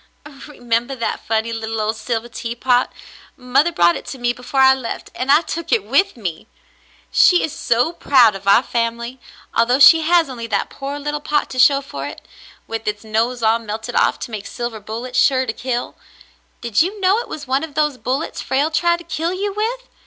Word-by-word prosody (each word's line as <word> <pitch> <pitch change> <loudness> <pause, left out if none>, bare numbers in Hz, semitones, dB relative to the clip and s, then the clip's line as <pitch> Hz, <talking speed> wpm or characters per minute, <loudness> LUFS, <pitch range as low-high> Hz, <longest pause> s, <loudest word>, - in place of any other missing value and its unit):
"Remember 240 -2 -2
that 235 - -4
funny 225 +1 0
little 225 0 -4
old 215 +1 -1
silver 225 +1 -3
teapot. 245 +1 0 0.5
Mother 265 +6 +2
brought 170 - +3
it - - -8
to 270 - -6
me 240 -1 0
before 250 +2 -2
I 265 0 +7
left, 255 -3 -6
and 260 +2 -1
I 295 +3 +6
took 335 +1 -5
it 215 - +3
with 275 - +1
me! 175 -8 -5 0.6
She 360 - +5
is 310 - -3
so 245 +7 0
proud 255 -9 +4
of 195 0 -9
our 200 +5 +6
family, 235 +1 -3 0.3
although 240 +2 +3
she 305 +4 +8
has 335 0 +3
only 240 -3 -7
that 205 -3 -2
poor 280 +1 -6
little 295 +1 -3
pot 295 0 -1
to 255 - -5
show 275 +2 +5
for 140 - -7
it, - - -11 0.4
with 225 -1 -6
its 210 0 -3
nose 225 +2 -1
all 225 +1 +3
melted 220 +2 -6
off - - +2
to - - -6
make 215 -2 -6
silver 240 -2 -5
bullets 235 +5 -4
sure 260 -2 +3
to 220 - -3
kill. 245 0 -4 0.7
Did 235 -3 +1
you 390 +5 -1
know 385 +3 +3
it 480 - -6
was 295 - -7
one 265 +3 0
of 320 -3 -8
those 300 -4 0
bullets 265 +5 -3
Frale 285 +4 0
tried 345 +2 +2
to 345 - -12
kill 335 +1 -3
you 400 +2 -3
with 475 +4 -3
250 Hz, 205 wpm, -19 LUFS, 230-295 Hz, 0.7 s, she